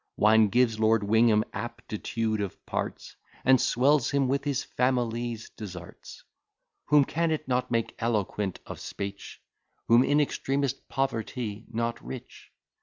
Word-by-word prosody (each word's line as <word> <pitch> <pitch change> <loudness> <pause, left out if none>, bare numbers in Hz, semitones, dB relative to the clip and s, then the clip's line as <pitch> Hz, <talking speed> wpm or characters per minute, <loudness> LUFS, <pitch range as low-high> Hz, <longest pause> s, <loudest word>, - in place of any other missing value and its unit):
Wine 110 +1 +5
gives 115 0 +2
Lord 110 -1 +3
Wingham 110 +1 +4
aptitude 110 -1 -3
of 100 -3 -6
parts, - - -4 0.3
And 130 -1 +6
swells 135 +1 +3
him 140 -2 +1
with 140 +2 0
his 140 -2 0
family's 120 -2 -1
deserts: 90 -5 -10 0.6
Whom 145 -2 +5
can 165 +4 0
it 155 -2 -2
not 125 -1 0
make 115 -1 0
eloquent 105 -4 -1
of - - -8
speech; 100 0 -6 0.5
Whom 120 +2 +6
in 145 +2 +3
extremest 140 -2 -1
poverty 115 -4 -3
not 115 0 -2
rich? 130 - -9
115 Hz, 130 wpm, -28 LUFS, 110-130 Hz, 0.6 s, And